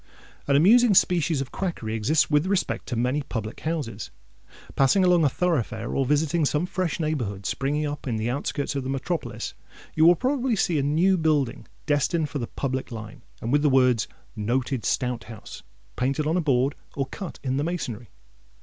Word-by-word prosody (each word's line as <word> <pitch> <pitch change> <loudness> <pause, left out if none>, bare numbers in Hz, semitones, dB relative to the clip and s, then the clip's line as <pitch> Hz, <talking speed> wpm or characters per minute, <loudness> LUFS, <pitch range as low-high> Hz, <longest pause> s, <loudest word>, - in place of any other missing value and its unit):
An 140 - +3
amusing 215 +8 +6
species 170 -5 +3
of 135 - -6
quackery 165 - -3
exists 115 +8 +2
with 150 +3 +2
repect 195 -1 -1
to 125 - -3
many 125 +5 0
public 115 -5 -5
houses. 150 - -4 0.7
Passing 140 +8 +4
along 175 -2 +4
a 145 - +4
thoroughfare, 125 -9 -1
or 135 -2 +1
visiting 155 +3 +2
some 150 +3 +1
fresh 180 -2 -2
neighbourhood 120 - -2
springing 145 +3 -1
up 145 -1 -5
in 120 - -1
the 110 +1 -2
outskirts 140 +2 -2
of 135 - -2
the 130 - -4
metropolis, 135 +6 -3 0.4
you 155 - +3
will 175 +2 +8
probably 260 - 0
see 170 -5 +1
a - - +2
new 170 +7 +2
building, 150 -6 0 0.2
destined 150 +2 +1
for 145 - -4
the 120 - -3
"public" 130 -1 -3
line, 110 +3 -8 0.2
and 115 - -2
with 145 +1 +4
the 150 - +3
words—"NOTED 125 -1 0
STOUT 125 -2 -1
HOUSE"—painted 125 +5 -5
on 160 +2 +1
a 180 - +2
board, 135 -2 +2 0.2
or 140 - -1
cut 180 +7 -8
in 130 -1 -1
the 145 - 0
masonry. 125 - -4
145 Hz, 175 wpm, -25 LUFS, 125-165 Hz, 0.7 s, will